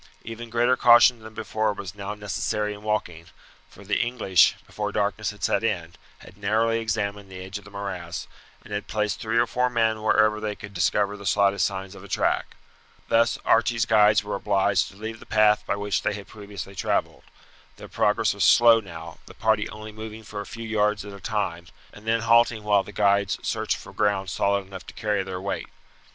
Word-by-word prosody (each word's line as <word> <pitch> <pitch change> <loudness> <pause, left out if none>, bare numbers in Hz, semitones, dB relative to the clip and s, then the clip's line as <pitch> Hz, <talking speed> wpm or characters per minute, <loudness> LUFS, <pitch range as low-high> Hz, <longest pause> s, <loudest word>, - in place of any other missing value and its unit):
Even 115 +1 -8
greater 120 +2 +3
caution 120 0 +6
than 110 0 -12
before 110 -1 -1
was 95 -3 -7
now 100 0 -6
necessary 105 0 -2
in 105 - -11
walking, 90 -6 -3 0.4
for 100 - -15
the 100 +1 0
English, 115 -7 +3
before 105 -1 -4
darkness 105 0 -1
had 105 0 -10
set - - +1
in, 85 -7 -2 0.2
had 95 - -16
narrowly 110 +3 +1
examined 105 -3 -3
the 95 - -8
edge 95 +2 -6
of 100 - -19
the - - -12
morass, 95 -4 -6 0.4
and - - -10
had 105 0 -3
placed 105 -1 -1
three 115 +1 -1
or 120 - +4
four 125 +2 0
men 110 -2 +1
wherever 110 0 +3
they 105 -1 -3
could 100 0 -10
discover 100 +3 +1
the 100 0 -11
slightest 100 -2 +3
signs 95 0 -6
of 100 - -12
a - - -10
track. - - 0 0.5
Thus 115 +1 +3
Archie's 115 0 +3
guides 105 -1 +4
were 105 - -5
obliged 100 -1 +1
to - - -16
leave 110 +2 -7
the - - -15
path 105 -1 +4
by - - 0
which 100 0 -1
they - - 0
had 100 -1 -8
previously 100 -2 -9
travelled. 95 - -1 0.5
Their - - -11
progress - - +1
was - - -1
slow 115 -1 +7
now, 85 -5 -10
the - - -13
party 110 -1 +1
only 110 0 -9
moving 110 +1 -9
for 105 -1 -6
a - - -9
few 115 -1 -7
yards 105 -1 +1
at 100 - -8
a 100 - -10
time, 95 -5 -3 0.3
and 105 +1 -14
then 115 0 +2
halting 115 -1 +3
while 105 -1 +3
the 105 - -10
guides 100 0 +2
searched - - -1
for - - -12
ground 100 -3 0
solid 100 0 0
enough 95 -1 -10
to - - -11
carry 105 -2 0
their 95 -1 -5
weight. 100 +1 -4
105 Hz, 205 wpm, -25 LUFS, 100-110 Hz, 0.5 s, slow